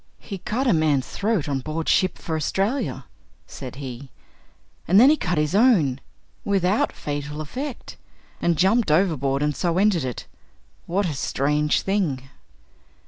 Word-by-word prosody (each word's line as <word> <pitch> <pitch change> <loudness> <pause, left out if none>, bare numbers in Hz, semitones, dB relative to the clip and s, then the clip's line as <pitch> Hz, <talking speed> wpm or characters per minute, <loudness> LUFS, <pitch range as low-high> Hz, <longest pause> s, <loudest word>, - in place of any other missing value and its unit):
"He 195 -3 -8
cut 245 +9 -2
a 240 - +4
man's 155 -5 +2
throat 200 -7 -1
on 140 -2 -1
board 155 +4 -4
ship 185 -1 +2
for 160 - -4
Australia," 195 - -1 0.4
said 130 -2 -9
he, 135 -1 -8 0.8
"and 190 +4 +6
then 260 +5 +8
he - - +4
cut 180 - -2
his 150 +2 0
own, 195 - +4 0.4
without 195 +1 +1
fatal 145 0 -5
effect 250 - -6 0.4
and 170 -2 +1
jumped 200 +4 +3
overboard, 150 -5 +2
and 150 -1 0
so 170 +4 0
ended 195 -5 +3
it. 125 -3 -5 0.6
What 195 +4 0
a 165 - -2
strange 150 +2 0
thing!" 150 -10 -1
165 Hz, 145 wpm, -23 LUFS, 145-200 Hz, 0.8 s, then